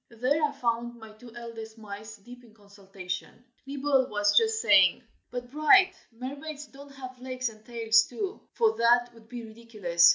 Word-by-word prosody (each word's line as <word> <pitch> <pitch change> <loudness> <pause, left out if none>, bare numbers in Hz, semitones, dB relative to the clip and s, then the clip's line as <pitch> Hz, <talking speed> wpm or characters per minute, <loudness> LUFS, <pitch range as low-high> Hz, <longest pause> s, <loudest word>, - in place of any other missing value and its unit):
There 255 +7 0
I 295 - +3
found 240 -3 -2
my 220 -1 -12
two 230 +3 -14
eldest 230 -2 -8
mice 215 0 -9
deep 245 +4 -14
in 225 -2 -19
consultation. 200 0 -8 0.2
Nibble 275 -1 +1
was 205 0 +2
just 445 0 +4
saying, - - +5 0.3
"but, 245 0 -6
Bright, 370 +6 +5 0.2
mermaids 280 +5 -7
don't 280 0 -14
have 255 -2 -9
legs 255 -1 -2
and 215 -1 -16
tails, 225 -1 +3
too, 375 - -4
for 450 -1 +3
that 240 +1 +3
would 225 -1 -18
be 240 -2 -7
ridiculous. 215 -7 +3
235 Hz, 165 wpm, -28 LUFS, 220-270 Hz, 0.3 s, saying